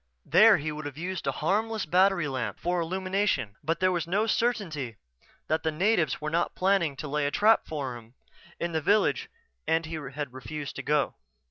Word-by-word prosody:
There - - +7
he 155 +2 -3
would 150 0 -5
have 145 -1 -9
used 180 -2 -4
a - - +3
harmless 210 +9 -1
battery 180 0 +3
lamp 130 -3 -3
for 175 0 -1
illumination... 185 - -1
but 165 +1 -1
there 185 0 +3
was 175 -2 -1
no 200 +5 +1
certainty 180 - -1 0.5
that 155 +1 +1
the 160 - 0
natives 175 0 +1
were 155 0 -3
not 170 +1 0
planning 185 -6 +2
to 150 - -6
lay 145 0 0
a - - +1
trap 215 +8 +3
for 140 -5 -4
him 115 +1 -13 0.4
in 170 - -2
the 160 -1 -1
village 205 +7 +2 0.4
and 160 +1 +2
he 160 - -7 0.2
had 145 -4 -4
refused 135 +2 -6
to - - -3
go. 150 -1 +1
160 Hz, 195 wpm, -28 LUFS, 145-190 Hz, 0.5 s, There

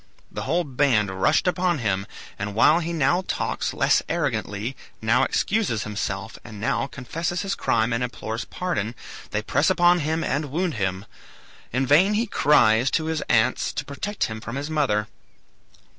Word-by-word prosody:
The - - -5
whole 175 +3 +2
band 120 - +1
rushed - - +3
upon 180 -1 +1
him, 100 -5 -1 0.3
and 100 0 -4
while 150 +9 +5
he 170 0 -3
now 160 +3 +2
talks - - -2
less - - +3
arrogantly, 125 -7 -2 0.2
now 115 +3 +2
excuses 185 - 0
himself, 105 -1 -4
and 110 -3 -10
now 115 +5 0
confesses 165 +7 -3
his 195 0 -1
crime 115 - +1
and 115 +1 0
implores 115 -2 -4
pardon, 115 - -3 0.3
they 105 0 -2
press 145 - +2
upon 175 -1 +4
him 160 +1 -1
and 145 +4 -1
wound 165 +4 -1
him. 95 -3 -2 0.7
In 130 +3 0
vain 175 +10 +4
he 225 +3 +1
cries 130 - +4
to 160 - 0
his 160 -1 -1
aunts 115 +2 +2
to 145 - -4
protect 200 +9 -4
him 110 0 -3
from 115 +1 -6
his 145 +3 -4
mother. 120 -9 +1
135 Hz, 165 wpm, -24 LUFS, 110-165 Hz, 0.7 s, while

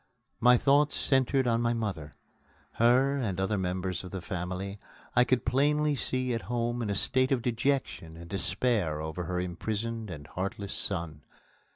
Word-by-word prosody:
My 125 +1 +6
thoughts 145 +3 +3
centred 135 0 +2
on 115 -1 +2
my 120 0 +1
mother. 95 -10 -4 0.7
Her 130 +4 +4
(and 100 -9 -2
other 95 +2 0
members 90 -1 -2
of 90 - -7
the 95 - -5
family) 95 +3 -4 0.4
I 125 - +6
could 125 -2 +1
plainly 150 +4 +2
see 130 -2 -1
at 115 - -2
home 120 0 -1
in 110 - -2
a 100 - 0
state 130 +6 +2
of 125 -4 +1
dejection 120 - -1
and 85 0 -10
despair 95 -2 0
over 80 +3 -4
her 90 +2 -2
imprisoned 110 +5 -3
and 75 -5 -7
heartless 100 +5 -4
son. 85 -6 -2
110 Hz, 165 wpm, -29 LUFS, 90-125 Hz, 0.7 s, My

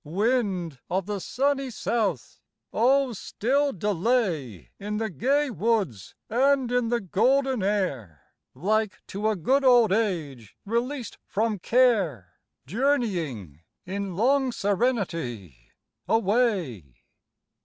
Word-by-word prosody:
Wind 185 - -1
of 185 +1 -1
the 205 0 -3
sunny 275 +5 -1
south! 210 - -2 0.3
oh 260 +2 +3
still 275 +8 0
delay 185 - -1
In 210 +1 -3
the 220 -1 -2
gay 275 - +1
woods 190 - -1
and 265 +1 +2
in 245 -2 +1
the 240 0 +1
golden 255 +6 +1
air, 140 - -2 0.3
Like 215 +8 -1
to 205 +3 -2
a 215 - 0
good 260 - +1
old 245 -5 +5
age 160 - -2
released 235 +3 -3
from 215 0 -1
care, 190 - +2 0.3
Journeying, 170 - -1 0.2
in 195 0 -4
long 260 +5 +2
serenity, 170 - -2 0.4
away. 195 - 0
210 Hz, 105 wpm, -26 LUFS, 170-245 Hz, 0.4 s, old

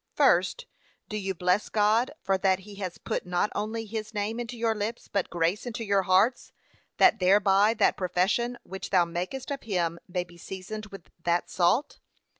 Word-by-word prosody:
First, - - +3 0.4
Do - - -4
you 195 -2 -2
bless 180 +4 +1
God, 220 +4 +3
for 195 - +2
that 190 0 +2
he 205 +2 -12
has 185 -3 -5
put - - -3
not 180 +3 0
only 220 +2 -3
his 215 0 -6
name 210 +3 -2
into 240 0 -5
your 225 -1 +1
lips, 215 +2 -4
but 200 -3 -1
grace 175 +7 0
into 230 -1 -4
your 200 -2 +2
hearts, 190 +7 +2 0.5
that 225 - +5
thereby 195 +3 +4
that 215 - +3
profession 190 +7 0
which 190 0 -7
thou 180 -3 +4
makest 180 - -4
of 275 - -3
him 170 -5 -1
may 180 -1 -2
be 175 -1 -17
seasoned 200 +4 -7
with 195 -4 -12
that 175 0 +1
salt. 190 - +1
200 Hz, 180 wpm, -27 LUFS, 180-220 Hz, 0.5 s, that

